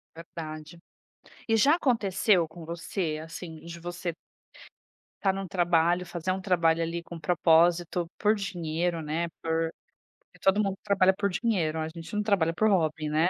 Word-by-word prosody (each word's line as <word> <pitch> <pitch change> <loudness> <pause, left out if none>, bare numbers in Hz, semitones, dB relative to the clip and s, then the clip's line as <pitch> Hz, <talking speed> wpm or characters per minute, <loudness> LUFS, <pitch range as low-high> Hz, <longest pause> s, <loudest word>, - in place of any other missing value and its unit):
Verdade. 160 0 -8 0.7
E 225 -1 +3
já 280 +8 +5
aconteceu 205 - +2
com 160 +2 -12
você 165 -1 -3
assim 165 0 -8
de 170 0 -8
você 175 0 -4 1.1
estar 195 -1 +2
em - - -3
um 195 - -5
trabalho, 175 0 +2
fazer 175 +1 -3
um 190 - -1
trabalho 165 -3 +2
ali 170 +1 -2
com 170 0 -9
propósito, 170 0 +3
por 210 +1 +3
dinheiro 175 -3 -2
né 160 +3 -2 0.2
por, 165 0 0 0.5
porque - - -25
todo 195 +2 +4
mundo 195 -1 -1
trabalha 190 -2 +4
por 200 -1 +1
dinheiro, 180 -7 0
a 155 - -2
gente 165 +3 -9
não 210 - +1
trabalha 185 -6 +2
por 215 +6 +2
hobby, 160 -5 +1
né. 160 +4 +2
175 Hz, 165 wpm, -28 LUFS, 165-190 Hz, 1.1 s, já